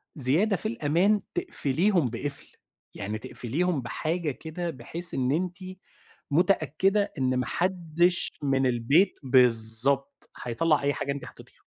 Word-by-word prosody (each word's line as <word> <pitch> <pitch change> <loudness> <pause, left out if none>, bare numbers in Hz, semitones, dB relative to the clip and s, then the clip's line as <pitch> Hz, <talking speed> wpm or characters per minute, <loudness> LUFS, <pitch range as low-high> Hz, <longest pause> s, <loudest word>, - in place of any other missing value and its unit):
زيادة 160 - +2
في 215 - -3
الأمان 200 0 +1
تقْفِليهم 185 - 0
بقفْل، 135 +5 -5 0.4
يعني 105 +2 -4
تقْفِليهم 145 +9 -2
بحاجة 155 +6 -3
كده 160 +5 -6
بحيث 165 +5 -2
إن 130 0 0
أنتِ 175 +3 -2 0.7
مُتأكّدة 185 +4 +1
إن 130 -1 0
ما 125 - -1
حدِّش 175 +2 0
من 135 -1 +1
البيت 135 - +2
بالضبط 125 +2 +4
هيطلَّع 150 +6 +1
أي 145 0 +1
حاجة 140 - -3
أنتِ 140 0 -6
حطّيتيها. - - -15
150 Hz, 125 wpm, -26 LUFS, 130-180 Hz, 0.7 s, بالضبط